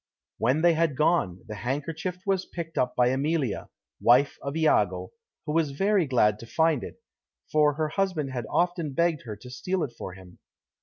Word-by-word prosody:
When 130 +8 +2
they 175 -1 +6
had 160 -4 +1
gone, 150 - +1
the 110 - -6
handkerchief 145 - -3
was 195 -2 0
picked 165 -2 -6
up 125 0 0
by 125 0 +4
Emilia, 135 -1 -1 0.3
wife 125 +4 +4
of 140 +1 -4
Iago, 160 -1 +2 0.3
who 150 - -2
was 155 -3 +1
very 195 -3 +2
glad 105 -5 +3
to 115 - -10
find 160 -1 +2
it, - - -9 0.5
for 150 -1 +4
her 155 0 -1
husband 180 -7 -1
had 120 -4 -4
often 175 -4 0
begged 165 -2 +1
her 110 -3 -5
to 125 +4 -12
steal 180 +7 -2
it 130 - -4
for 95 -5 -7
him. 95 -2 -15
150 Hz, 185 wpm, -27 LUFS, 125-165 Hz, 0.5 s, they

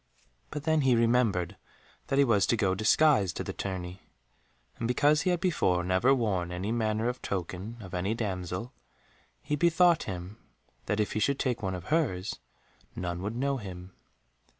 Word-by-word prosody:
But 150 -2 -5
then 160 -1 +2
he 130 -3 +4
remembered 115 -6 +2 0.5
that 135 - 0
he 140 - +6
was 110 -5 +3
to 115 - +2
go 95 -3 +2
disguised 110 - +3
to - - -2
the - - -5
tourney, 95 -1 -5 0.8
and 115 - -1
because 145 +5 +3
he - - 0
had 175 -1 +1
before 95 - +1
never 95 +8 +3
worn 100 -9 +1
any 90 +4 -3
manner 110 -1 0
of 125 0 -3
token 95 +4 -4
of 95 -3 -10
any 95 +5 -1
damsel, 95 +1 -4 0.7
he 150 0 -1
bethought 170 +2 +4
him 90 +2 -7 0.5
that, 105 - 0
if 105 - 0
he - - -1
should 140 +6 +1
take 125 -4 -1
one 95 -2 -2
of 90 0 -8
hers, 110 - 0 0.6
none 85 -1 -3
would 105 +4 -3
know 140 +2 0
him. 95 -4 -9
110 Hz, 175 wpm, -29 LUFS, 95-135 Hz, 0.8 s, he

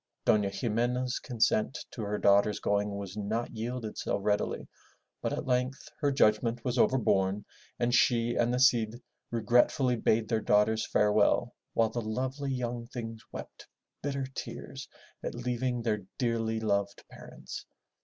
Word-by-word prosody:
'* - - -53
Dofia 105 -2 +4
Ximena's 120 +3 0
consent 115 -1 +1
to 115 - -6
her 105 0 -2
daughters' 100 +1 +4
going 100 0 0
was 100 -1 -6
not 110 +3 -2
yielded 115 0 -4
so - - 0
readily, 105 +1 -1 0.5
but - - -1
at - - -3
length 130 +3 -1
her 145 -2 +2
judgment 115 -2 +2
was 125 0 0
overborne 100 -6 +2 0.3
and 120 0 +1
she 120 -1 +3
and 120 0 +2
the 125 - +1
Cid 120 -3 +3 0.3
regretfully 120 +3 +3
bade 110 0 +2
their 110 -1 +1
daughters 105 +2 +3
farewell 105 0 +3 0.2
while 115 -1 +3
the 120 - -2
lovely 130 +5 -2
young 120 -2 -3
things 115 -3 -6
wept - - -9 0.3
bitter 140 -1 -2
tears - - -7 0.3
at - - -3
leaving 120 0 -1
their 105 -3 0 0.2
dearly 115 -2 0
loved 100 -2 -1
parents. - - -9
115 Hz, 145 wpm, -30 LUFS, 105-125 Hz, 0.5 s, Dofia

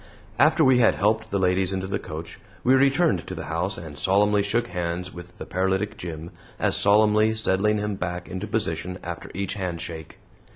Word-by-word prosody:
After 155 +2 +5
we 130 -1 +5
had 115 - +4
helped 110 +2 +1
the 100 - 0
ladies 95 0 +1
into 95 -1 -2
the 95 - -2
coach, 80 +2 -8 0.2
we 130 - +4
returned 140 +5 +3
to - - -5
the - - -6
house 90 +5 -2
and 80 -4 -9
solemnly 100 +4 +3
shook 115 +4 0
hands 90 +1 -3
with 90 0 -11
the - - -7
paralytic 95 +3 -1
Jim, 85 -3 -7 0.3
as - - +2
solemnly 105 +1 +4
settling 105 0 +2
him 105 0 -2
back 90 0 -4
into 95 +3 -5
position 90 -4 -2
after 85 -1 -6
each 95 0 -2
handshake. 85 -4 -5
95 Hz, 180 wpm, -24 LUFS, 90-105 Hz, 0.3 s, After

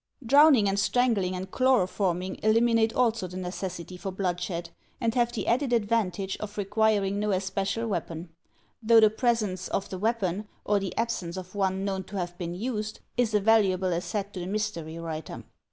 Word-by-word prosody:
Drowning 280 -3 +6
and 195 0 +1
strangling 200 -4 +2
and 185 +1 -6
chloroforming 190 -7 +1
eliminate 225 +1 +3
also 230 -6 +1
the 180 +1 -8
necessity 180 -1 -5
for 195 +2 -5
bloodshed, 180 -2 -3 0.3
and 230 -3 0
have 240 -1 +2
the 240 - -4
added 250 +2 +1
advantage 205 -4 0
of 210 0 -7
requiring 205 -1 +1
no 210 0 0
especial 195 +3 -1
weapon; 170 -3 -4 0.5
though 225 0 +6
the 215 -1 +6
presence 215 -6 0
of 195 - -2
the 185 - -5
weapon, 210 -2 -1 0.2
or 205 -1 +2
the 195 -2 -5
absence 190 -7 -2
of 185 0 -8
one 190 -1 0
known 190 -1 -2
to 205 - -7
have 175 -1 -3
been 175 -1 -4
used, 215 0 -3 0.2
is 235 -3 +1
a - - +5
valuable 195 -4 +3
asset 195 +4 -3
to 185 - -5
the 175 - -4
mystery 190 -6 -3
writer. 160 -2 -6
200 Hz, 170 wpm, -27 LUFS, 185-225 Hz, 0.5 s, Drowning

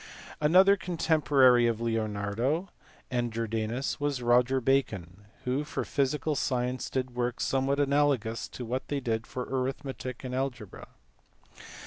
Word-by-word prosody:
Another 185 +6 +6
contemporary 150 -9 +3
of 115 -1 0
Leonardo 115 - -1 0.4
and 120 -2 0
Jordaiius 115 +3 -2
was 145 -1 0
lloger 125 +2 +3
Bacon, 105 -8 -1 0.2
who 130 +4 0
for 150 - -4
physical 145 +2 0
science 125 -1 -1
did 130 -1 -2
work 120 0 -2
somewhat 135 +1 +1
analogous 140 -5 +1
to 125 - -7
what 125 +3 -3
they 145 - -1
did 115 -3 -2
for 125 - -4
arithmetic 130 -1 -4
and 125 -1 -5
algebra. 125 -6 -4
130 Hz, 125 wpm, -29 LUFS, 115-140 Hz, 0.4 s, Another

